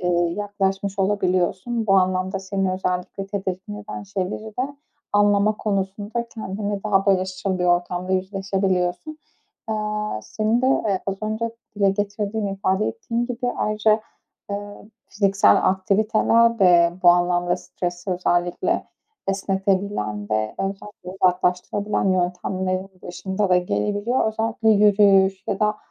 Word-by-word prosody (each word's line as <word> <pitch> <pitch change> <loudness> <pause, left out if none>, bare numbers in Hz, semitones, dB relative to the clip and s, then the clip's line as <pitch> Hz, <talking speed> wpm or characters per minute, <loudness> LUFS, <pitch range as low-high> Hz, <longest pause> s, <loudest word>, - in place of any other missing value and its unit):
eee, 180 - -1 0.3
yaklaşmış 200 -1 -2
olabiliyorsun. 190 +3 0
Bu 195 - +3
anlamda 185 0 +1
seni 190 -1 -1
özellikle 185 +1 -3
tedirgin 195 0 -4
eden 200 - -7
şeyleri 200 +1 -4
de 275 +3 -3 0.4
anlama 205 +1 +3
konusunda 205 +3 -2
kendinle 205 -1 -4
daha 195 -1 +2
barışçıl 185 0 0
bir 180 - 0
ortamda 180 +1 0
yüzleşebiliyorsun. 190 - -1 0.5
Eee, 220 - 0 0.5
senin 220 +3 0
de, - - +3 0.2
eee, 190 -2 +1
az 195 0 -1
önce 220 +2 -2 0.3
dile 200 -1 +3
getirdiğin 205 +1 -2
ifade 195 +1 0
ettiğin 240 - -3
gibi 245 0 -2
ayrıca, 215 +1 +2 0.5
eee, 200 - -1 0.5
fiziksel 195 -1 +4
aktiviteler 215 +4 +2
de 175 -3 +5
bu 175 - +7
anlamda 175 0 +2
stresi 175 +1 -5
özellikle 175 -1 0 0.4
esnetebilen 190 - -1
ve 110 0 0
özellikle 195 -1 -5
uzaklaştırabilen 180 +3 +1
yöntemlerin 185 +1 -1
başında 190 +3 -2
da 180 - +5
gelebiliyor. 205 - 0
Özellikle 220 0 -1
yürüyüş 200 -2 +4
ya 200 -1 -2
da, 210 0 +2
195 Hz, 120 wpm, -22 LUFS, 185-210 Hz, 0.5 s, bu